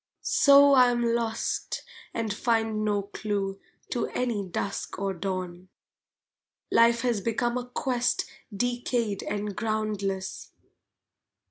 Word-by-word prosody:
So 280 0 +6
I 250 -2 +7
am 240 0 0
lost 230 -1 -2 0.3
and 220 -3 -2
find 225 -1 0
no 205 -1 +1
clue 200 -1 -3 0.3
To 240 - 0
any 235 -5 -1
dusk 195 +2 -4
or 195 0 -1
dawn! 185 0 -4 1.0
Life 235 0 +5
has 235 -4 0
become 235 +3 0
a 250 0 -3
quest 245 -1 0 0.3
decayed 240 -1 -1
and 205 -1 -3
groundless. 210 -3 -2
220 Hz, 110 wpm, -27 LUFS, 200-240 Hz, 1.0 s, I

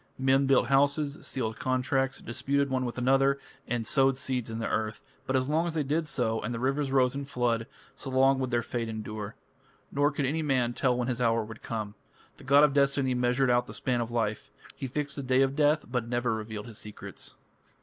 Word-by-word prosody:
Men 135 +1 +3
built 135 -2 +4
houses, 140 +2 +2
sealed 110 -4 -3
contracts, 130 +1 0
disputed 140 +3 -1
one 130 -1 0
with 120 - -5
another, 135 +2 +3 0.3
and 120 -2 -1
sowed 135 0 +3
seeds 130 -3 -2
in 110 - -4
the 115 - -2
earth, 110 -1 -2 0.2
but 130 - 0
as 130 0 +1
long 160 +3 +1
as 165 - -4
they 155 - +1
did 155 +3 -1
so 115 -6 0
and - - -3
the - - -4
rivers 135 +2 0
rose 130 -2 +3
in 140 +1 -4
flood, 120 -4 0 0.3
so 135 - -7
long 135 +1 +4
would 130 -1 -1
their 120 -1 +1
fate 115 -1 -3
endure. 110 -1 -5 0.6
Nor 145 +1 +3
could 145 -1 -1
any 155 +5 0
man 130 -5 +1
tell 125 -1 +1
when 120 -1 -1
his 125 -1 -2
hour 115 -1 +2
would 110 0 -10
come. 110 -3 -4 0.4
The - - -14
god 140 +2 +6
of 150 -2 +4
destiny 140 -2 +2
measured 125 +1 +2
out 120 0 +2
the - - -6
span 125 -2 0
of 115 - -3
life: 110 -3 -2 0.3
he 135 - -4
fixed 145 +2 -4
the - - -2
day 130 0 +3
of 135 0 0
death, 150 +1 +3
but 120 -1 -2
never 120 -1 0
revealed 110 -1 -5
his 115 -3 -9
secrets. 105 -1 -9
130 Hz, 220 wpm, -29 LUFS, 120-140 Hz, 0.6 s, god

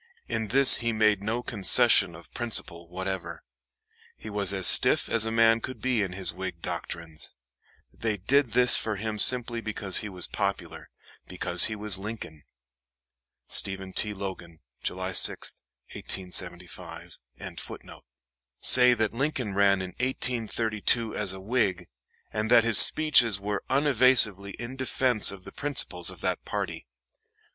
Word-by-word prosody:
In 110 -1 -4
this 135 +4 +6
he 115 -1 -3
made 110 -2 +1
no 115 +4 -4
concession 95 -5 +4
of 85 - -12
principle 95 -8 -2
whatever. 95 +1 -7 0.7
He 110 - -11
was 100 -2 -2
as 95 -2 -4
stiff - - +6
as 115 -1 -1
a 110 - -4
man 115 0 +2
could 130 - -8
be 125 -4 -1
in 95 -3 -4
his 95 0 -2
Whig - - -7
doctrines. 80 -2 -7 0.6
They 110 -2 -4
did 125 +5 0
this 125 0 +4
for 110 -1 -2
him 105 +1 -6
simply 120 0 +2
because 100 -3 -2
he 105 - -7
was 90 -2 -6
popular - - -5 0.4
because - - 0
he 110 - -4
was 105 -2 -4
Lincoln. 100 -8 -9 1.0
STEPHEN 95 -1 +2
T. 105 +1 -2
LOGAN. 90 -4 -9 0.2
July - - -4
6, - - +3 0.3
1875.] 90 -1 -4 1.4
say 125 -1 +6
that 110 -1 -2
Lincoln 130 -4 -3
ran 100 -1 +1
in 90 - -8
1832 115 -3 -1
as 100 -3 -3
a 95 - -9
Whig, 95 -4 -2 0.5
and 110 0 -3
that 120 -2 +5
his 115 -1 +5
speeches 120 -10 +4
were 100 0 -5
unevasively 125 -8 +3
in 120 +2 -8
defense 130 -3 +1
of 95 -2 -9
the - - -12
principles 125 -11 -1
of - - -11
that - - -3
party. - - -6
105 Hz, 140 wpm, -25 LUFS, 95-120 Hz, 1.4 s, this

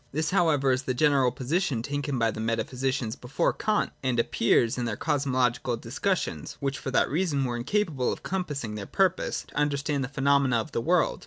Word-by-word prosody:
This 155 +4 -1
however 155 -8 +3
is 130 +1 +1
the 130 -1 -2
general 140 -3 +3
position 135 -1 -1
taken 145 0 -2
by 115 -1 +2
the 110 - -7
metaphy 115 +2 -2
sicians 130 -3 -1
before 125 +3 0
Kant, 215 -1 0
and 130 -3 0
appears 115 0 +2
in 125 - -2
their 110 -3 -3
cosmological 130 -5 0
dis 115 +3 -8
cussions, 195 -2 -1
which 140 0 -2
for - - -4
that 130 - +3
reason 150 -3 0
were 120 -1 -2
incapable 145 - 0
of - - -6
compassmg 145 - -3
their 100 -2 -6
purpose, 190 -1 0
to - - -18
understand 145 -1 0
the - - -2
phenomena 140 -3 +2
of 115 +6 -3
the 115 - -1
world. 170 +4 +2
135 Hz, 195 wpm, -27 LUFS, 120-150 Hz, -, however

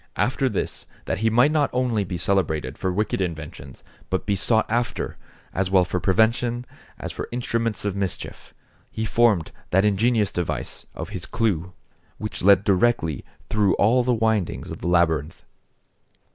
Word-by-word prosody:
After 130 +1 +1
this, 105 - -3 0.2
that - - -2
he 110 +1 +2
might 125 +6 +4
not 150 -3 +2
only 125 -4 +1
be 90 -1 -4
celebrated 80 -7 0
for 95 - -2
wicked 100 +1 -1
inventions, 75 -6 -6 0.3
but 95 - -1
be 100 - +1
sought 110 +4 +2
after, 120 0 -1 0.4
as 95 0 0
well 95 -1 +4
for 90 - -2
prevention, 115 +5 +2 0.3
as - - -5
for - - -6
instruments 115 -3 -2
of 100 -2 -1
mischief, 100 -3 -4 0.4
he 110 - -3
formed 110 -7 +2 0.2
that 95 +3 +3
ingenious 105 0 +2
device 90 -2 -4
of 80 +2 -5
his 95 -5 -6
clue, 95 -6 -1 0.4
which 110 -1 -4
led 100 +1 +6
directly 95 - +2 0.2
through 105 -3 +2
all 120 +5 +4
the 125 - +1
windings 110 -5 0
of - - -6
the - - -4
labyrinth. 80 -3 +1
100 Hz, 160 wpm, -24 LUFS, 90-115 Hz, 0.4 s, led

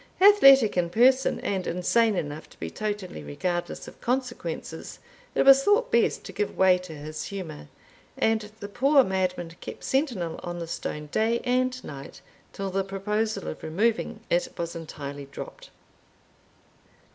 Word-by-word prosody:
Athletic 275 - +7
in 175 -1 +1
person, 255 +7 +4
and 190 -2 -2
insane 215 +5 +2
enough 150 -2 -4
to - - -20
be - - -5
totally 205 - -4
regardless 175 - -3
of - - -13
consequences, 240 -11 -3 0.4
it - - +4
was 270 0 +8
thought 420 - +3
best 235 - +2
to - - -8
give 205 0 -3
way 185 -1 +5
to 180 -3 -9
his 155 +1 -6
humour; 170 - -7 0.5
and 220 -1 +1
the 205 - -5
poor 270 +6 +4
madman 185 -4 -1
kept - - -8
sentinel 240 - -1
on 175 -1 -5
the 170 - -4
stone 150 -2 -5
day 230 +2 +1
and 255 0 0
night, 140 -1 -9 0.3
till 195 -1 -4
the 195 +1 0
proposal 210 - -2
of 80 - -6
removing 215 +6 -1
it 175 +1 +1
was 170 0 -4
entirely 145 -3 -7
dropped. 140 - -9
195 Hz, 150 wpm, -26 LUFS, 170-235 Hz, 0.5 s, was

